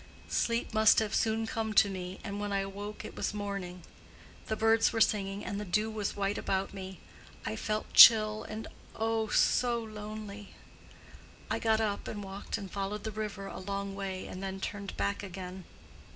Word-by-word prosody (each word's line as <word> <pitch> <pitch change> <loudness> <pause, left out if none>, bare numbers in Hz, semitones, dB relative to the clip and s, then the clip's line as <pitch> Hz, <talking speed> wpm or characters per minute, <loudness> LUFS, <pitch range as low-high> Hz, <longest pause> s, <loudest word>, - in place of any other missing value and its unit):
Sleep 230 -1 0
must 220 0 +6
have 220 -1 +1
soon 225 0 +1
come 220 -1 -2
to - - +7
me, 185 -1 -5
and 200 -1 -4
when 205 0 -3
I 195 0 +1
awoke 200 +2 -6
it - - -8
was - - -2
morning. 195 -4 -5 0.6
The 220 - 0
birds 225 +1 +4
were 225 - -1
singing, 200 -2 +1
and 200 - -3
the - - -3
dew 210 +3 0
was 210 -2 -3
white 200 0 -1
about 190 0 -1
me, 190 -2 -7 0.5
I 110 - -2
felt 215 - -3
chill 215 -2 +9
and 215 +1 -6 0.3
oh, 225 0 0
so 240 +2 +3
lonely! 210 -1 -8 1.0
I - - +1
got 220 -1 +2
up 205 -2 -1
and 205 -1 -5
walked 195 +1 -5
and 195 -2 -8
followed 205 +1 -3
the 220 - -3
river 210 -2 -4
a - - -7
long 200 +1 -4
way 195 -1 -4
and 185 - -7
then 195 0 -4
turned 200 0 -5
back 200 0 -1
again. 185 -2 -7
205 Hz, 180 wpm, -31 LUFS, 195-220 Hz, 1.0 s, chill